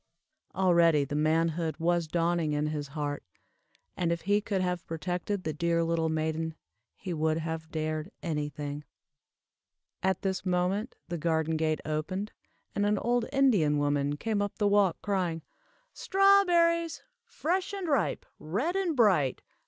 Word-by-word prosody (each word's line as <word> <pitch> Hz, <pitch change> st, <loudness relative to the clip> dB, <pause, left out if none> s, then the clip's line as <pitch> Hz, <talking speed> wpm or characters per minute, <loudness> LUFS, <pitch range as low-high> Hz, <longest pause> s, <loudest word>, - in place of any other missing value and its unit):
Already 170 Hz, -5 st, +4 dB
the 145 Hz, -, -6 dB
manhood 160 Hz, +2 st, +1 dB
was 170 Hz, 0 st, +1 dB
dawning 170 Hz, -1 st, 0 dB
in 150 Hz, +1 st, 0 dB
his 150 Hz, -1 st, -3 dB
heart; 145 Hz, -1 st, -2 dB, 0.7 s
and 170 Hz, -2 st, 0 dB
if 170 Hz, -1 st, -1 dB
he 205 Hz, +3 st, +2 dB
could 200 Hz, -2 st, -1 dB
have 180 Hz, -2 st, -1 dB
protected 180 Hz, +4 st, -3 dB
the 155 Hz, -, -2 dB
dear 170 Hz, +2 st, +1 dB
little 165 Hz, -1 st, 0 dB
maiden, 160 Hz, 0 st, -2 dB, 0.4 s
he 185 Hz, -3 st, -5 dB
would 160 Hz, 0 st, +1 dB
have 160 Hz, 0 st, -4 dB
dared 155 Hz, +1 st, -3 dB
any 150 Hz, -3 st, -1 dB
thing. 145 Hz, 0 st, -6 dB, 1.2 s
At 190 Hz, -1 st, 0 dB
this 190 Hz, -1 st, -1 dB
moment 185 Hz, +4 st, 0 dB
the 175 Hz, -1 st, -3 dB
garden 160 Hz, 0 st, 0 dB
gate 155 Hz, 0 st, 0 dB
opened, 185 Hz, +7 st, -3 dB, 0.4 s
and 205 Hz, -, 0 dB
an 205 Hz, 0 st, +2 dB
old 240 Hz, +2 st, 0 dB
Indian 215 Hz, -, +3 dB
woman 145 Hz, 0 st, 0 dB
came 215 Hz, +3 st, -1 dB
up 205 Hz, -1 st, -3 dB
the 210 Hz, -, +2 dB
walk, 200 Hz, -4 st, +3 dB
crying 180 Hz, -6 st, -1 dB, 0.5 s
"Strawberries! 350 Hz, -4 st, +3 dB, 0.2 s
fresh 365 Hz, +4 st, -2 dB
and 390 Hz, -3 st, -4 dB
ripe, 275 Hz, -, 0 dB
red 245 Hz, -, -2 dB
and 360 Hz, -6 st, 0 dB
bright. 185 Hz, -, +3 dB
170 Hz, 145 wpm, -29 LUFS, 155-205 Hz, 1.2 s, Already